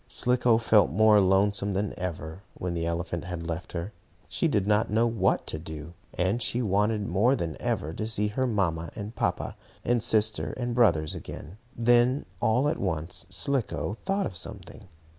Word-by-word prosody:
Slicko 125 -2 +2
felt 110 - +4
more 105 +5 +5
lonesome 100 +1 +2
than 100 +2 -1
ever 85 -1 -5
when 90 -1 -3
the 85 -1 -2
elephant 85 +1 -3
had 90 -2 -5
left 85 +1 -5
her. 90 +5 -4 0.3
She - - 0
did 100 -3 +1
not 105 +1 +2
know 110 +2 +3
what 110 -5 +1
to 80 - -5
do, 80 0 -8 0.2
and 95 +7 0
she 120 +2 +2
wanted, 105 +1 +1
more 105 +9 +3
than 85 - -3
ever, 80 +2 -1
to 110 +5 -3
see 105 -1 0
her 130 +5 -1
mamma 85 -7 0
and 105 +1 -6
papa, - - -2 0.3
and 120 -1 +2
sister 110 0 +1
and 120 -1 -2
brothers 85 -11 +3
again. 90 +8 -9 0.2
Then, 120 +3 +3
all 125 +6 +2
at 150 - -1
once, 80 -3 -3
Slicko 135 -6 -1
thought 195 +1 0
of 95 - -5
something. 90 +3 -7
105 Hz, 175 wpm, -27 LUFS, 85-115 Hz, 0.3 s, more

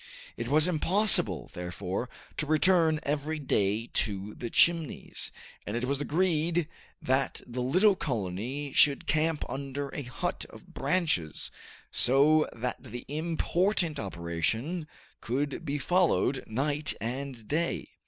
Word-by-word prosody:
It 115 - -4
was 150 +5 +3
impossible, 185 +5 +2
therefore, 90 +6 -4 0.3
to 155 - -1
return 160 0 +4
every 150 +2 -1
day 105 -6 +1
to 100 -1 -1
the 120 - -5
Chimneys, 165 -1 +2 0.3
and 105 +3 -3
it 120 - -1
was 140 +2 0
agreed 165 0 +1 0.4
that 130 +1 +1
the 125 +1 -4
little 185 +11 +4
colony 130 - -3
should 140 -2 +4
camp 155 0 +1
under 140 +1 -4
a 145 - -5
hut 125 -4 -3
of - - -14
branches, 140 - 0 0.4
so 150 +4 +4
that 125 +2 -4
the 120 - -8
important 170 +2 +1
operation 100 - -2 0.3
could 140 +6 -2
be 145 -2 -2
followed 165 -3 +2
night 145 +6 0
and 125 -1 -5
day. 165 +3 -1
140 Hz, 125 wpm, -29 LUFS, 120-160 Hz, 0.4 s, return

